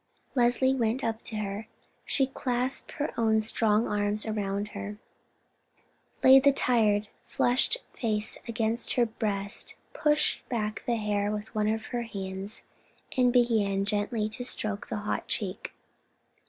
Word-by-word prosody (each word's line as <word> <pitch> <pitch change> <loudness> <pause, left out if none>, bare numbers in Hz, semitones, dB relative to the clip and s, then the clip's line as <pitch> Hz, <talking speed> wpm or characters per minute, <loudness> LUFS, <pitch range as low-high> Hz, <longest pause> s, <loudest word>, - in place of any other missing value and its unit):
Leslie 245 +1 +3
went 245 0 0
up 225 -1 -1
to 220 - -6
her; 210 0 -3 0.4
she 270 - +3
clasped 255 -1 -2
her 295 - -2
own 220 -1 +4
strong 220 0 +2
arms 205 +1 0
round 205 -1 -2
her, 205 0 -6 1.3
laid 265 0 +8
the 280 - +7
tired, 215 -6 +2 0.2
flushed 250 - +2 0.2
face 215 -2 0
against 225 0 -1
her 245 - +3
breast, 205 -2 -2 0.2
pushed 300 0 +2
back 215 -3 -2
the 240 - +2
hair 205 -1 0
with 210 +1 -5
one 210 -1 +1
of 220 0 -1
her 240 - 0
hands, 195 -2 -5 0.5
and 250 -1 +4
began 220 -5 +2
gently 210 +1 0
to 235 +4 -6
stroke 215 -4 -2
the - - -2
hot 210 0 -3
cheek. 195 -3 -3
220 Hz, 140 wpm, -28 LUFS, 210-240 Hz, 1.3 s, laid